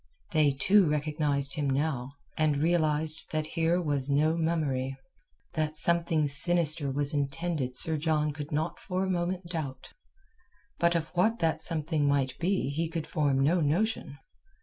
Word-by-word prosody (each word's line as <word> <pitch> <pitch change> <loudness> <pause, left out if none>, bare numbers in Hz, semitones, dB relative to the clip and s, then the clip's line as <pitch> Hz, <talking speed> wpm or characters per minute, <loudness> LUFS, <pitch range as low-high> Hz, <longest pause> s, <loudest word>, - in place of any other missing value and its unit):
They 150 -4 +3
too 185 +6 +4
recognized 150 -2 +1
him 145 -3 -1
now, 135 -2 -1 0.2
and 155 -2 +1
realized 155 -1 +1
that 155 -1 -2
here 165 +1 +2
was 145 -5 -1
no 150 +3 +2
mummery. 145 -6 -1 0.6
That 155 -1 -2
something 165 -1 +3
sinister 155 0 +1
was 145 +2 -2
intended 140 -2 -2
Sir 160 +3 +1
John 150 -1 0
could 145 0 -7
not 155 +3 -2
for 185 +1 -2
a 190 - -1
moment 180 +1 -2
doubt. 140 -6 -5 0.9
But 170 0 +3
of 165 -1 -1
what 200 +6 +1
that 165 -5 0
something 155 -2 +1
might 135 -2 +1
be 180 -5 0
he 160 +3 -2
could 165 -2 -4
form 140 -3 0
no 165 +6 +3
notion. 160 0 -1
155 Hz, 150 wpm, -29 LUFS, 145-170 Hz, 0.9 s, too